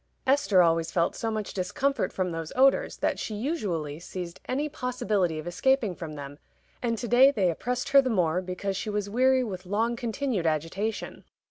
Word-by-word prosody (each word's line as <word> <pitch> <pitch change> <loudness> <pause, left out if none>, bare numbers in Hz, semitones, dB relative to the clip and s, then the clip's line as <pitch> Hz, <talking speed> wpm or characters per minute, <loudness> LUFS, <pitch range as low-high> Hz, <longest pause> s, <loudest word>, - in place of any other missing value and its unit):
Esther 265 -9 +4
always 165 -1 +2
felt 170 -1 0
so 225 - -2
much 215 -2 -3
discomfort 265 +10 -1
from 185 -2 -2
those 165 -1 -5
odors 270 +1 +3
that - - -1
she 215 - -4
usually 195 - -2
seized 180 0 -7
any 280 +4 0
possibility 240 - -1
of 155 - -6
escaping 220 +4 +1
from 165 -3 -7
them, 145 0 -8 0.4
and 230 -2 0
to 240 - -4
day 250 +4 +7
they 195 -10 +1
oppressed 250 - -3
her 275 0 +7
the 260 - -2
more 180 -5 +1
because 185 +2 -3
she 215 - -3
was 205 -1 -2
weary 260 +2 +3
with 185 -5 -6
long 225 +5 0
continued 235 - -2
agitation. 165 +8 -2
205 Hz, 185 wpm, -27 LUFS, 175-250 Hz, 0.4 s, day